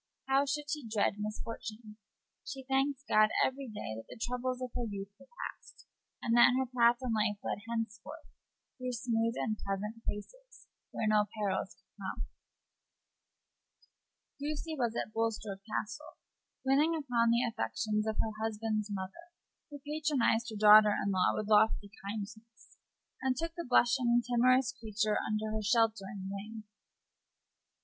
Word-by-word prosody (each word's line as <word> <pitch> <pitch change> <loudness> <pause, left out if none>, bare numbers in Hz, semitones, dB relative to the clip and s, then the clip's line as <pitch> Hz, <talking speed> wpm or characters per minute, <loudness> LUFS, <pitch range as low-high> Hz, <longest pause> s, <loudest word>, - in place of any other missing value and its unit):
How 270 +1 +3
should 295 +1 -2
she 295 -6 -3
dread 215 -2 +1
misfortune? 215 0 -6 0.5
She 270 -2 -7
thanked 270 +1 0
God 215 0 +5 0.2
every 270 +1 -3
day 210 - -5
that 115 - -8
the - - -10
troubles 250 +2 -2
of 255 -1 -4
her 245 - -1
youth 200 -1 -6
were 270 - -16 0.2
past, - - -10 0.4
and 230 - +2
that 240 +1 +7
her 265 - +1
path 240 -1 +4
in 245 -3 0
life 210 -1 +1
led - - -2
henceforth 230 +7 -4 0.5
through 255 0 -3
smooth 230 -1 0
and 215 -2 -1
pleasant 210 +3 -4
places, - - -7 0.2
where - - -3
no 215 -1 +4
perils 200 -3 -1
could - - -23
come. - - -4 2.2
Lucy 305 +2 -3
was 240 -5 -1
at 215 - -3
Bulstrode 220 -3 -2
Castle, 215 0 -4 0.5
winning 295 +5 +4
upon 245 -6 +1
the 235 +1 +3
affections 215 -2 -1
of 220 - -1
her 220 - -3
husband's 215 -1 -1
mother, 200 - -6 0.4
who 290 - -8
patronized 290 -6 +1
her 220 - -6
daughter 210 0 +8
in 200 - +1
law 185 -1 +3
with 215 - -2
lofty 210 -1 +3 0.2
kindness, 220 +2 -8 0.5
and 260 -1 +1
took 330 +2 -3
the 340 -3 -6
blushing, 240 -1 +4
timorous 255 +2 +4
creature 215 -3 -1
under 215 0 -2
her 215 0 -2
sheltering 210 -3 +1
wing. 215 +2 -7
225 Hz, 145 wpm, -32 LUFS, 215-255 Hz, 2.2 s, daughter